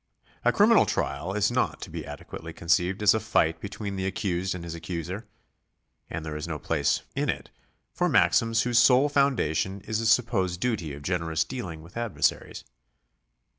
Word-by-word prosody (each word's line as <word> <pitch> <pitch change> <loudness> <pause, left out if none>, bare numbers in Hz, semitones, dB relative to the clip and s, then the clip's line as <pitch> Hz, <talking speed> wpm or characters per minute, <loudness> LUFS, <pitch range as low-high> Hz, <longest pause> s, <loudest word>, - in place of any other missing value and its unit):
A - - +4
criminal - - +5
trial 70 +7 -2
is 105 +2 +2
not 125 +1 0
to - - -7
be - - -6
adequately 75 0 -8
conceived 90 +4 +1
as 105 - +7
a 110 - +1
fight 80 -7 +1
between 100 -1 -5
the 95 0 -1
accused 95 -2 -2
and 90 - -7
his 85 -1 -6
accuser; 90 +5 -5 0.8
and 80 - -5
there 75 -1 -5
is 75 +2 -5
no 80 -2 -3
place - - 0
in - - 0
it - - -3 0.4
for - - +1
maxims 115 -1 +3
whose 120 -1 +3
sole 130 +4 +5
foundation 120 - +1
is 110 +2 -2
a 115 - 0
supposed 100 -7 +2
duty 90 - -2
of 70 - -11
generous 80 -2 0
dealing 90 -8 -6
with 85 +6 -12
adversaries. 110 -11 -1
95 Hz, 170 wpm, -27 LUFS, 80-115 Hz, 0.8 s, as